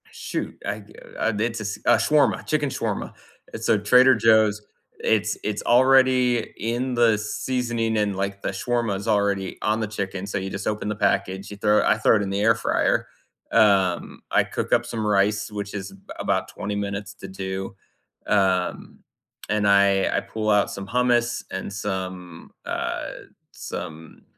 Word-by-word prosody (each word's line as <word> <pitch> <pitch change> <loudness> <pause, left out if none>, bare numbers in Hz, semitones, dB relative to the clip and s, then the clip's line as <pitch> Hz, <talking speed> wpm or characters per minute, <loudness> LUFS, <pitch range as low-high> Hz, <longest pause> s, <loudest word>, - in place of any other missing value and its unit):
Shoot, - - -5
I, 105 +1 -4 0.4
uh, 115 - +1
it's 115 0 -1 0.2
uh, - - +5
a - - +7
shawarma 150 -1 +2
chicken 145 -2 0
shawarma. - - -3 0.4
It's - - -4
uh, 110 - +5
Trader 125 +6 +6
Joe's 110 -1 +4 0.4
It's 105 -1 +1
it's 105 -1 -2
already 130 -1 +4
in 120 +3 -2
the 115 -2 +4
seasoning 115 +1 -2
and, 105 -2 0
like, 100 0 -3
the - - -2
shawarma 115 +1 -1
is 100 - -7
already 100 -3 0
on 105 +1 +1
the 110 - -1
chicken, 100 -2 -4
so 100 - -3
you 95 0 -3
just 100 0 -5
open 105 0 -2
the 105 - -2
package, 100 -2 0
you 105 - -8
throw 105 +1 +3
I - - +3
throw 110 +1 +4
it - - -1
in 100 - -3
the 100 +1 -1
air 115 +2 +4
fryer. 115 - 0 0.5
Um, 100 -5 +2
I - - +4
cook - - -3
up - - +3
some 110 -2 -4
rice, 105 +1 +1
which 100 -1 -5
is 100 -1 -6 0.3
about - - 0
20 105 - -5
minutes 100 0 -4
to 100 - -9
do. 95 0 -5 0.5
Um, 95 -3 0 0.5
and 105 -1 +1
I 100 -1 +4
I - - +3
pull 110 -1 -3
out 105 -1 +3
some 100 0 -7
hummus 120 0 +1
and 95 +1 -5
some, 95 -4 -5
uh, - - -3 0.4
some 80 -2 -8
105 Hz, 165 wpm, -24 LUFS, 100-115 Hz, 0.5 s, a